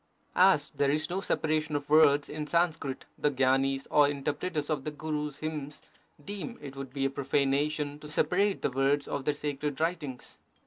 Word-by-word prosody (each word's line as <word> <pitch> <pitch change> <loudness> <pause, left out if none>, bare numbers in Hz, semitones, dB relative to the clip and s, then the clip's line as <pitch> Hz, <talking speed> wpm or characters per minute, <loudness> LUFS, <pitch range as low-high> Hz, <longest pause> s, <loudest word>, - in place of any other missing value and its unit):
As - - +4
there 140 - +1
is 155 +3 0
no 190 +2 -1
separation 155 -4 0
of 145 0 -2
words 145 -2 +5
in 150 0 -5
Sanskrit, 165 -5 0
the 150 - +3
gyanis, 135 0 +1
or 145 -1 +6
inter 145 0 -1
preters 150 -2 -3
of 145 -3 -1
the 150 - -2
Gurus 150 -1 -4
hymns, 150 -2 -5 0.4
deem 205 +4 -5
it 140 -2 -9
would 135 -1 -7
be 135 0 -1
a - - +2
profanation 145 +2 0
to 150 - -10
separate 195 +6 +1
the - - +1
words 135 +2 +1
of 140 -2 -3
their 150 - +1
sacred 145 -1 -3
writings. 160 -6 -3
145 Hz, 180 wpm, -29 LUFS, 140-155 Hz, 0.4 s, or